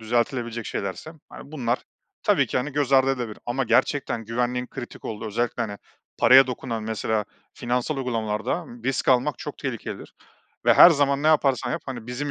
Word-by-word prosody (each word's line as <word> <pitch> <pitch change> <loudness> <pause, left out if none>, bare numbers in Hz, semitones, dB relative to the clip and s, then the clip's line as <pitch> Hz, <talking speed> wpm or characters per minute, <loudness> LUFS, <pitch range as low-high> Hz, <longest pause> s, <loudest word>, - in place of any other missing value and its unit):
düzeltilebilecek 120 0 -1
şeylerse, 100 +10 -5 0.2
hani, 145 - -12
bunlar 125 -5 -1 0.4
tabii - - +3
ki, - - -3
hani, 140 +3 -1
göz 140 -1 -1
ardı 135 0 +5
edilebilir 120 -5 -4
ama 125 +2 -1
gerçekten 120 0 +1
güvenliğin 125 +2 -1
kritik 125 -2 -9
olduğu, 110 0 -5
özellikle, 120 +2 -1
hani, 105 -2 -5 0.4
paraya 135 +1 +7
dokunan 115 -3 -4
mesela, 110 -1 -1 0.3
finansal 125 +3 -2
uygulamalarda 115 +4 -2 0.2
risk 135 0 -1
almak 130 +2 +3
çok 150 - -7
tehlikelidir 130 -5 -6 0.5
ve - - +6
her 175 - +10
zaman 140 -2 +1
ne - - +1
yaparsan 135 -5 +2
yap, - - -3
hani, 120 -4 -6
bizim, 135 +4 -4
125 Hz, 165 wpm, -24 LUFS, 115-135 Hz, 0.5 s, her